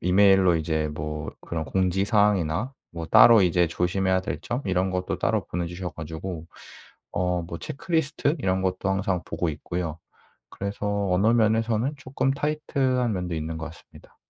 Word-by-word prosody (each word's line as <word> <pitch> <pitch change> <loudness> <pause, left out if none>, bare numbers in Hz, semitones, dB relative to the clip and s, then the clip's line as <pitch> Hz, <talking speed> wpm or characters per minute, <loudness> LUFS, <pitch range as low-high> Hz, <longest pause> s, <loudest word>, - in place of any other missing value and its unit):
이메일로 95 0 +5
이제 80 -1 0
뭐 75 0 -4
그런 80 -2 -4
공지사항이나 95 - +1 0.2
뭐 85 -1 -5
따로 115 +5 +8
이제 90 -1 +3
조심해야 95 +2 +1
될 80 -4 -4
점 120 +6 -3
이런 95 -1 +1
것도 90 0 -2
따로 - - +1
보내 85 0 -3
주셔 90 +1 -5
가지고 80 +2 -6 0.7
어 90 0 0
뭐 85 0 -6
체크리스트 160 -1 -1
이런 95 -4 0
것도 95 +1 -1
항상 95 -2 0
보고 85 - -2
있고요. 80 +2 -4 0.5
그래서 100 0 -2
어느 95 +4 +3
면에서는 115 +3 +2
쪼끔 135 -1 -1
타이트 150 +1 -2
한 125 -3 +2
면도 90 -3 -3
있는 80 +1 -4
것 80 - -5
같습니다. 80 0 -14
95 Hz, 340 characters per minute, -25 LUFS, 85-110 Hz, 0.7 s, 따로